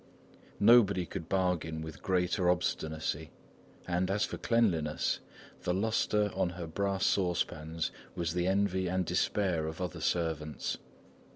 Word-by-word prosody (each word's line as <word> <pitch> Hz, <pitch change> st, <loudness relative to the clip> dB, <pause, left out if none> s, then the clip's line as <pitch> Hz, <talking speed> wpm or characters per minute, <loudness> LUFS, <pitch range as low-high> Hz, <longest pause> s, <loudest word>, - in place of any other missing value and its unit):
Nobody 100 Hz, -5 st, +6 dB
could 85 Hz, -2 st, -6 dB
bargain 90 Hz, -4 st, 0 dB
with 80 Hz, -3 st, -8 dB
greater 90 Hz, 0 st, +1 dB
obstinacy, 80 Hz, -3 st, -1 dB, 0.6 s
and 90 Hz, +1 st, 0 dB
as 105 Hz, +2 st, +2 dB
for -, -, -6 dB
cleanliness, 85 Hz, -11 st, +1 dB, 0.4 s
the 90 Hz, -, 0 dB
lustre 105 Hz, 0 st, +1 dB
on 90 Hz, -, +1 dB
her 85 Hz, -1 st, -6 dB
brass 100 Hz, +3 st, -1 dB
saucepans 85 Hz, -3 st, 0 dB, 0.2 s
was 85 Hz, -2 st, -1 dB
the 90 Hz, 0 st, 0 dB
envy 95 Hz, -1 st, +1 dB
and 90 Hz, +1 st, 0 dB
despair 90 Hz, -6 st, +1 dB
of 80 Hz, +2 st, -6 dB
other 90 Hz, -3 st, -4 dB
servants. 80 Hz, -3 st, -1 dB
90 Hz, 125 wpm, -31 LUFS, 80-95 Hz, 0.6 s, Nobody